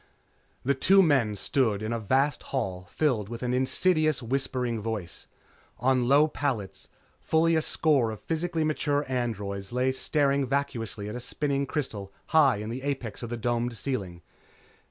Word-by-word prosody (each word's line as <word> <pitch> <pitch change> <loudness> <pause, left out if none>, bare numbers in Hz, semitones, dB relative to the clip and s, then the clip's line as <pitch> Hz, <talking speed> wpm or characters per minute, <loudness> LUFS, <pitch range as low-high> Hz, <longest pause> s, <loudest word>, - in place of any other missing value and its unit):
The 140 - +2
two 195 +9 +5
men 135 - +2
stood 110 -3 0
in 110 +2 -2
a 115 - -1
vast 135 +7 +1
hall 95 -9 -3
filled 120 -10 0
with 120 +1 -6
an 125 0 0
insidious, 155 +3 +2
whispering 125 -2 -1
voice. 105 -6 -5 0.5
On 125 -1 +2
low 145 +3 +5
pallets, 115 -11 -3 0.3
fully 165 +1 +2
a 160 - +3
score 145 -7 +2
of 110 - -6
physically 165 0 -1
mature 150 -1 0
androids 105 -6 -3
lay 125 +2 +1
staring 140 0 +1
vacuously 120 -7 -2
at 105 - -5
a 125 - -4
spinning 140 +2 -1
crystal 105 -10 -4 0.2
high 145 -5 +5
in 105 +2 -5
the 125 +3 -5
apex 130 -7 -4
of 120 - -5
the 120 - -3
domed 120 0 -1
ceiling. 95 -12 -4
130 Hz, 155 wpm, -27 LUFS, 110-145 Hz, 0.5 s, two